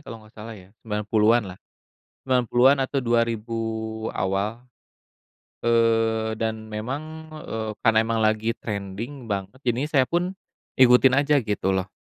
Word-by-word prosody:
kalo 115 Hz, -2 st, -10 dB
nggak 105 Hz, -, -19 dB
salah 110 Hz, +1 st, -9 dB
ya, 95 Hz, 0 st, -16 dB
90-an 110 Hz, +2 st, +2 dB
lah. 95 Hz, -1 st, -9 dB, 0.7 s
90-an 130 Hz, +1 st, +3 dB
atau 135 Hz, 0 st, -1 dB
2000 115 Hz, -1 st, 0 dB, 0.6 s
awal. 100 Hz, +5 st, -2 dB, 1.0 s
Eee, 115 Hz, -1 st, +2 dB
dan 110 Hz, -1 st, -3 dB
memang, 115 Hz, +7 st, -4 dB, 0.4 s
eee, 110 Hz, -1 st, -4 dB
karena 115 Hz, -2 st, +4 dB
emang 115 Hz, 0 st, +1 dB
lagi 110 Hz, +1 st, +1 dB
trending 110 Hz, +5 st, -6 dB
banget, 100 Hz, +2 st, -4 dB
jadinya 125 Hz, +5 st, 0 dB
saya 135 Hz, -4 st, +3 dB
pun 175 Hz, +4 st, 0 dB, 0.5 s
ikutin 130 Hz, +1 st, +6 dB
aja 145 Hz, +1 st, +2 dB
gitu 105 Hz, -3 st, -1 dB
loh. 95 Hz, 0 st, -2 dB
115 Hz, 130 wpm, -24 LUFS, 105-125 Hz, 1.0 s, ikutin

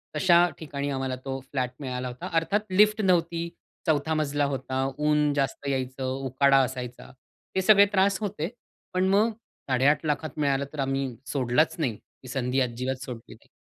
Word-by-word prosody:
तशा 175 Hz, -1 st, +5 dB
ठिकाणी 145 Hz, -2 st, -4 dB
आम्हाला 130 Hz, -1 st, -2 dB
तो 135 Hz, 0 st, -3 dB
फ्लॅट 130 Hz, -3 st, -1 dB
मिळाला 125 Hz, -2 st, -4 dB
होता. 125 Hz, 0 st, -6 dB
अर्थात 165 Hz, +6 st, +2 dB
लिफ्ट 210 Hz, +3 st, +4 dB
नव्हती, 170 Hz, -3 st, +1 dB, 0.4 s
4था 155 Hz, 0 st, +2 dB
मजला 145 Hz, -2 st, 0 dB
होता, 130 Hz, 0 st, -2 dB
ऊन 150 Hz, -1 st, +2 dB
जास्त 140 Hz, 0 st, -2 dB
यायचं, 130 Hz, -1 st, -2 dB, 0.2 s
उकाडा 135 Hz, +1 st, +4 dB
असायचा. 125 Hz, -1 st, -6 dB, 0.4 s
ते 190 Hz, -, +2 dB
सगळे 200 Hz, +1 st, +7 dB
त्रास 195 Hz, 0 st, +3 dB
होते. 190 Hz, -5 st, -2 dB, 0.4 s
पण 185 Hz, +1 st, +2 dB
मग 210 Hz, +4 st, +4 dB, 0.4 s
8.50 135 Hz, +5 st, +3 dB
लाखात 150 Hz, 0 st, -2 dB
मिळालं 140 Hz, -1 st, +1 dB
तर 150 Hz, -, -7 dB
आम्ही 135 Hz, -2 st, -1 dB
सोडलाच 130 Hz, +3 st, +1 dB
नाही. 130 Hz, -9 st, 0 dB
ती 130 Hz, -, -19 dB
संधी 130 Hz, 0 st, -1 dB
अजिबात 125 Hz, +1 st, -2 dB
सोडली 120 Hz, -3 st, -8 dB
नाही. -, -, -20 dB
140 Hz, 160 wpm, -26 LUFS, 130-165 Hz, 0.4 s, सगळे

